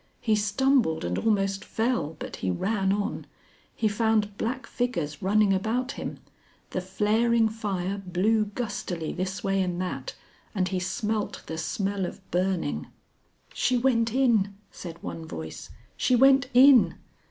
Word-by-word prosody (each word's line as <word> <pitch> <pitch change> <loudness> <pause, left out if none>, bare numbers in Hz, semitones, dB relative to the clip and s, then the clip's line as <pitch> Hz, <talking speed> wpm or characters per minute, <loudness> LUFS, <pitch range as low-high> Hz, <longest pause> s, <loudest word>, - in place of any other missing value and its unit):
He 220 -2 +2
stumbled 210 - +2
and 90 +1 -1
almost 195 -3 +1
fell, 225 - -1
but - - -7
he 95 - -2
ran 195 - 0
on. 205 0 -2 0.5
He 220 - +1
found 210 -1 +1
black 255 +5 -3
figures 170 -13 -2
running 205 +1 +3
about 230 +7 0
him. - - -6 0.5
The 185 - -2
flaring 220 +5 +2
fire 200 -3 -3
blew 195 +4 +1
gustily 200 -7 -4
this 185 +1 -3
way 195 0 +1
and 180 -1 -1
that, 185 - -4 0.4
and 185 -2 +1
he 185 - -1
smelt 210 +3 -2
the 160 0 -5
smell 195 +2 -1
of 190 - -11
burning. 180 - -1 0.7
"She 250 - +1
went 235 -2 +2
in," 225 -6 +2 0.2
said 170 -2 -8
one 165 -1 -6
voice, 80 - -7 0.3
"she 250 - +2
went 265 0 +5
in." 260 -2 +7
205 Hz, 140 wpm, -27 LUFS, 185-230 Hz, 0.7 s, in